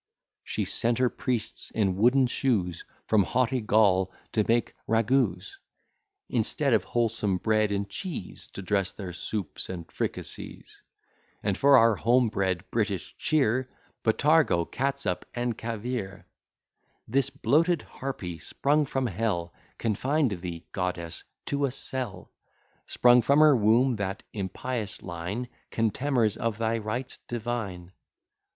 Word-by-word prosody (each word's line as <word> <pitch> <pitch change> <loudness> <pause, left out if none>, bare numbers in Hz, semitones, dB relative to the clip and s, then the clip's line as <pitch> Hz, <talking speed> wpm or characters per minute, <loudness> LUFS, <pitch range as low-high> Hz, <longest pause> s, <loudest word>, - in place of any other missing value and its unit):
She - - -2
sent 115 0 +3
her 125 -1 +2
priests 120 -4 -3
in 100 -4 +2
wooden 125 +6 +4
shoes 105 -10 0 0.2
From 110 -2 +4
haughty 125 +6 +1
Gaul 100 -3 +3 0.2
to 110 - +2
make 115 -1 +1
ragouts; 115 -4 +1 0.7
Instead 130 +4 +2
of 105 -5 +3
wholesome 115 -5 0
bread 110 +1 +1
and 100 0 -1
cheese, 140 - -6
To 100 - -7
dress 100 0 +1
their 95 -4 -7
soups 95 -1 -4
and 85 -3 -5
fricassees; - - -5 0.6
And, 100 -2 +1
for 140 +4 +6
our 115 -2 +5
home 120 0 +3
bred 95 -4 -1
British 100 -5 -1
cheer, 130 -4 +1 0.3
Botargo, 135 - +3
catsup, 135 -9 -2
and 120 -1 -1
caviare. 115 -3 -4 0.8
This 135 +3 +1
bloated 160 +7 +2
harpy, 90 -11 -6
sprung 145 - +1
from 135 0 -1
hell, 95 -5 -1 0.2
Confined 130 +5 +1
thee, 85 -2 -6
goddess, 90 -3 -3 0.2
to 140 0 0
a - - -4
cell: 130 -3 -5 0.6
Sprung 125 0 +5
from 140 +5 +3
her 155 -2 +7
womb 115 +3 +3
that 95 -1 -3
impious 105 +2 -4
line, 90 +9 -4 0.2
Contemners 115 -1 +1
of 115 -2 -1
thy 115 0 0
rites 115 +4 -4
divine. 110 -7 -4
115 Hz, 125 wpm, -27 LUFS, 100-130 Hz, 0.8 s, her